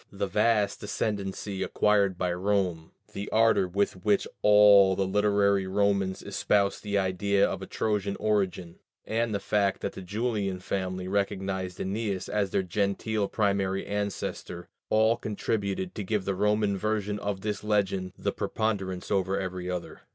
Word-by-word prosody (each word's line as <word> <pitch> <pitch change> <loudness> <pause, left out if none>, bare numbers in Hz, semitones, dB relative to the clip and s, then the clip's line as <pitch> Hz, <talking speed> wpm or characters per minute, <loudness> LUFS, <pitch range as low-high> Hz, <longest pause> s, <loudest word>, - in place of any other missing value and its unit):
The 100 0 -2
vast 105 +1 +1
ascendancy 100 -1 -3
acquired 100 -2 +2
by 90 -1 0
Rome, 90 -3 -1 0.2
the 100 +1 -5
ardor 115 -4 +3
with 95 0 -1
which 105 -2 +2
all 105 -2 +7
the 95 - 0
literary 100 0 +2
Romans 100 -1 0
espoused 100 -1 +1
the 100 -1 -1
idea 100 +1 +2
of - - -4
a - - -6
Trojan 105 -2 -1
origin, 95 -5 -1 0.3
and 115 +1 0
the 100 - -1
fact 100 0 0
that - - -3
the - - -8
Julian 100 0 -2
family 95 -1 -3
recognized 95 -2 -2
Æneas 100 0 -2
as 105 -2 0
their 95 - 0
gentile 100 +3 -1
primary 100 -2 0
ancestor, 100 -3 -4 0.2
all 110 +2 +3
contributed 100 -4 -2
to 105 - -4
give 105 0 -1
to - - -16
the 100 - -1
Roman 105 0 +1
version 105 0 -1
of 100 -2 -3
this 105 0 -3
legend 95 -3 0
the - - -1
preponderance 95 -4 -2
over 95 -1 +1
every 90 -1 -4
other. 90 -1 -5
100 Hz, 150 wpm, -28 LUFS, 95-105 Hz, 0.3 s, all